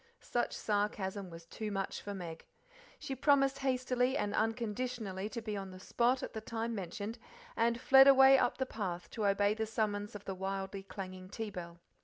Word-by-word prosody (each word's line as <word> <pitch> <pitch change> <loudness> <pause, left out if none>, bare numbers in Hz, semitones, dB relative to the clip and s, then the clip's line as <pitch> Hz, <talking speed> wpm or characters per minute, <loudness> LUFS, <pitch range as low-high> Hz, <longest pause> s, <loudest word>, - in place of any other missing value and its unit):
Such 240 - -1
sarcasm 205 -2 -1
was 165 0 -11
too 215 +5 -5
much 195 -1 -3
for 205 0 -5
Meg. 170 -3 -7 0.5
She 270 - -5
promised 275 0 +3
hastily 255 0 +1
and 205 -5 -1
unconditionally 220 -3 -2
to 235 0 -5
be 215 -2 -3
on 195 -1 -5
the 185 0 -10
spot 245 +6 +1
at - - -5
the 220 - -4
time 230 +1 -3
mentioned, 205 +3 -5 0.4
and 235 +1 +2
fled 270 +1 +8
away 270 0 +8
up - - +1
the 260 - 0
path 185 -8 -5
to 215 -3 0
obey 200 +1 +3
the 220 0 -2
summons 210 -2 -2
of 205 - -8
the 195 - -3
wildly 195 +1 -4
clanging 185 -1 -8
tea 220 0 -5
bell. 170 -2 -8
210 Hz, 185 wpm, -34 LUFS, 195-240 Hz, 0.5 s, fled